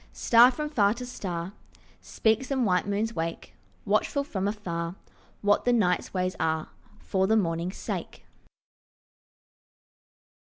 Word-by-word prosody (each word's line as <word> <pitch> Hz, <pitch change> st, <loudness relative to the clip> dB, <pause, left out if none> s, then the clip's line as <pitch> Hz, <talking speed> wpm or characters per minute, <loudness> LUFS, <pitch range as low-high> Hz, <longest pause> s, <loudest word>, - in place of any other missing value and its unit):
Star 235 Hz, +1 st, +6 dB
from 300 Hz, +4 st, -3 dB
far 215 Hz, -8 st, +2 dB
to 250 Hz, +1 st, -6 dB
star 185 Hz, -6 st, -5 dB, 0.5 s
Speaks, 220 Hz, +4 st, 0 dB
and 265 Hz, -3 st, +1 dB
white 180 Hz, -1 st, +1 dB
moons 210 Hz, +3 st, -1 dB
wake, 165 Hz, +1 st, -4 dB, 0.3 s
Watchful 280 Hz, -2 st, +1 dB
from 200 Hz, -9 st, -3 dB
afar 175 Hz, -5 st, -3 dB, 0.5 s
What 205 Hz, 0 st, +3 dB
the 245 Hz, -, +2 dB
night's 180 Hz, -7 st, +1 dB
ways 185 Hz, -1 st, -1 dB
are 160 Hz, -1 st, -1 dB, 0.3 s
For 190 Hz, -2 st, 0 dB
the 220 Hz, +2 st, +4 dB
morning's 170 Hz, -1 st, -1 dB
sake. -, -, -6 dB
205 Hz, 125 wpm, -27 LUFS, 180-230 Hz, 0.5 s, Star